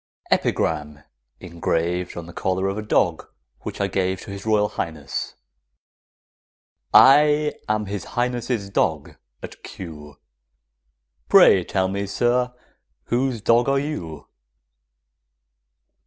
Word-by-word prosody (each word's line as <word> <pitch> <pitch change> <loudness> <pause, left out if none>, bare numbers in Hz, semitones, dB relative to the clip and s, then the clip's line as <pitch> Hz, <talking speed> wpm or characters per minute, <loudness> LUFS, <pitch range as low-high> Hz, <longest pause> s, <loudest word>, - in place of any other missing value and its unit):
EPIGRAM, 75 -1 0 0.4
ENGRAVED 85 0 -2
ON 85 - -6
THE 85 - -12
COLLAR 95 +1 -1
OF 100 - -4
A - - -3
DOG 105 - 0 0.3
WHICH - - -7
I 100 - +1
GAVE 95 -1 -1
TO - - -9
HIS 100 +2 -8
ROYAL 105 -1 +2
HIGHNESS. 75 -4 -5 1.6
I 150 +2 +6 0.2
am 110 0 0
His 100 -2 -5
Highness' 120 -3 -2
dog - - -1 0.3
at - - -10
Kew; 75 -5 -10 1.1
Pray 95 - +7
tell 95 +1 0
me, 100 +1 -3
sir, 125 +4 +1 0.6
whose 125 -1 0
dog 120 +5 +3
are 140 - +2
you? 90 - -5
100 Hz, 110 wpm, -22 LUFS, 85-120 Hz, 1.6 s, Pray